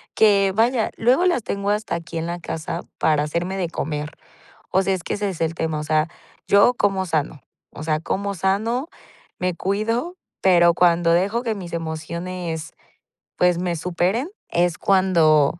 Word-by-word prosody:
que, 200 -3 +4
vaya, 230 +1 +2
luego 255 +10 +3
las 345 -11 +2
tengo 200 0 -2
hasta 210 +1 -1
aquí 165 0 -6
en 165 - -2
la 175 +1 -4
casa 160 -1 -4 0.2
para 150 -2 +2
hacerme 170 +5 -2
de 180 -3 -1
comer. 150 -2 -3 0.6
O 190 - +3
sea, 195 0 +1
es 185 - -4
que - - -3
ese 205 0 -1
es 180 - -8
el 165 0 0
tema, 160 -2 -2
o - - -4
sea, 155 +1 +1 0.4
yo 200 +5 +5
como 195 -4 0
sano, 155 -3 -2 0.3
o - - -9
sea, 155 -1 0
como 200 +4 -2
sano, 215 - 0 0.5
me 180 -1 -1
cuido, 225 - -1 0.2
pero 175 -2 +5
cuando 170 -1 +3
dejo 200 +7 +1
que 225 -3 -1
mis 180 -4 -8
emociones, 165 +1 -4 0.7
pues, 180 -1 +3
me 175 -1 -1
superen, 180 - -1 0.2
es 175 -1 +1
cuando 170 -6 +3
180 Hz, 170 wpm, -22 LUFS, 165-200 Hz, 0.7 s, yo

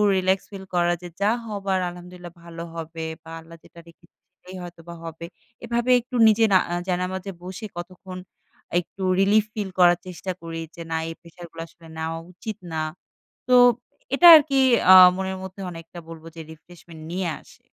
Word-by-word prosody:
relax 190 +1 +2
feel 195 -1 -8
করা, 175 0 +2
যে, 180 - -8
"যা 200 - +3 0.2
হবার 200 -3 -2
আলহামদুলিল্লাহ 175 0 -11
ভালো 170 0 -8
হবে 165 0 -6 0.2
বা 165 - -13
আল্লাহ 165 +1 -14
যেটা 170 - -16
রেখেছে 170 +1 -21 0.2
সেটাই 180 +1 -13
হয়তোবা 170 -1 -10
হবে।" 165 0 -8 0.4
এভাবে 240 +1 -1
একটু 250 +2 -10
নিজে 220 +1 +4
না - - +8
আ - - -1
জায়নামাজে 185 +1 -3
বসে 190 +4 -7
কতক্ষণ 185 +1 -8 0.6
একটু 180 +2 -10 0.2
relief 205 +2 +4
feel 205 -3 -3
করার 175 -1 +6
চেষ্টা 185 +1 -5
করি। 165 0 -6 0.2
যে 170 - -9
না - - 0
এই - - -5
প্রেশারগুলা 170 -1 -10
আসলে 165 0 -18
নেওয়া 160 +1 -3
উচিত 205 +4 -7 0.2
না। 160 - -2 0.7
তো 250 - +6 0.6
এটা 350 - +7
আরকি 285 -2 -1 0.4
আ - - +11 0.2
মনের 190 0 -3
মধ্যে 190 +1 -9
অনেকটা 165 +1 -10
বলবো 165 0 -10
যে 165 - -7
refreshment 165 0 -15
নিয়ে 185 0 -2
আসে। - - -21
180 Hz, 170 wpm, -23 LUFS, 165-190 Hz, 0.7 s, আ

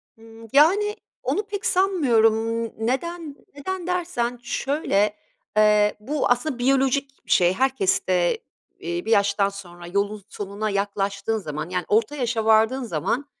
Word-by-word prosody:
Hıı. 225 0 -14
Yani, 390 +9 +4 0.3
onu 420 - 0
pek 405 -1 -5
sanmıyorum. 230 - +2
Imm, 225 - -7 0.2
neden 320 +3 -3 0.2
neden 360 +5 -5
dersen 325 -10 -2
şöyle: 215 -7 0 0.4
Eee, 210 -1 +4
bu 280 +8 -1
aslında 245 +2 0
biyolojik 270 +1 +1
bir - - -8
şey, 175 0 +4
herkeste, 190 -7 +1 0.4
iii, 170 +2 -4
bir 225 - -2
yaştan 200 -1 +3
sonra 175 -3 -11
yolun 200 +2 -2
sonuna 205 +2 -4
yaklaştığın 200 +1 -1
zaman, 155 -4 -5
yani 180 -1 -2
orta 230 +7 +1
yaşa 240 -5 -1
vardığın 220 +4 +3
zaman, 230 - -2
225 Hz, 135 wpm, -23 LUFS, 200-275 Hz, 0.4 s, Yani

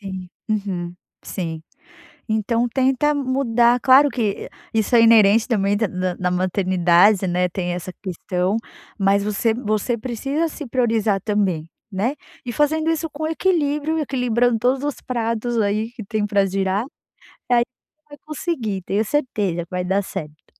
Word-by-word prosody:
Sim, 190 -2 -7 0.2
uhum 190 -5 -2 0.3
sim, 165 -3 -4 0.7
então 230 +2 0
tenta 265 +4 +2
mudar, 250 -3 +2
claro 270 +3 +6
que 230 -6 -2 0.2
isso 225 +2 +1
é 230 - +7
inerente 225 0 +6
também 205 -3 +1
da 220 0 0
na 185 0 -2
na 180 0 -1
maternidade, 185 +1 +3
né, 180 0 +1
tem 175 0 -3
essa 180 +1 -5
questão 185 +2 -1 0.4
mas 200 0 +2
você 210 +2 +1
você 220 0 -1
precisa 270 +7 -2
se 305 -1 -6
priorizar 225 -5 +1
também, 195 -7 0 0.2
né? 210 +7 -1 0.3
E 240 - -3
fazendo 310 +4 +1
isso 325 -1 -1
com 310 +1 -4
equilíbrio, 315 -2 0
equilibrando 245 -4 +1
todos 260 +3 +1
os 290 - -3
pratos, 230 -1 -1
aí, 210 +2 0
que 240 -3 -9
tem 215 0 -1
para 200 -1 +2
girar, 195 +3 0 0.7
aí, 240 -1 +5 0.3
você 305 - -54
vai 290 - -11
conseguir 260 - -3
tenho 205 +4 0
certeza 210 - -1
que - - -42
vai 180 0 -2
dar 190 +2 +1
certo. 155 -5 -8
220 Hz, 150 wpm, -21 LUFS, 190-255 Hz, 0.7 s, é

